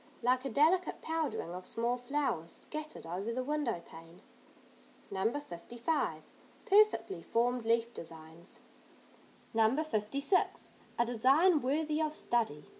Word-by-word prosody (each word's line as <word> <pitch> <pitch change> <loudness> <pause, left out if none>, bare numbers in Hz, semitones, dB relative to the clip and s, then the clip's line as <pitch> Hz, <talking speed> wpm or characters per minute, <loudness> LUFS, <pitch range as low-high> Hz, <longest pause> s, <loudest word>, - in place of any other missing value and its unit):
Like 255 +2 +2
a - - -1
delicate 320 +9 +3
powdering 320 - -2
of 180 +1 -6
small 235 +2 0
flowers, 250 - -2
scattered 305 - -6
over 185 +7 -3
the 255 +2 -2
window 265 - -1
pane. 165 +4 -14 0.9
No. 195 +3 +1
55. 240 - -3 0.4
Perfectly 225 - +4
formed 240 +4 0
leaf 230 +1 +2
designs. 165 +2 -11 0.9
No. 225 +7 +3
56. 280 - 0 0.3
A 235 - +3
design 275 +8 +4
worthy 300 +4 0
of 305 -1 0
study. 220 - -1
240 Hz, 115 wpm, -33 LUFS, 205-300 Hz, 0.9 s, Perfectly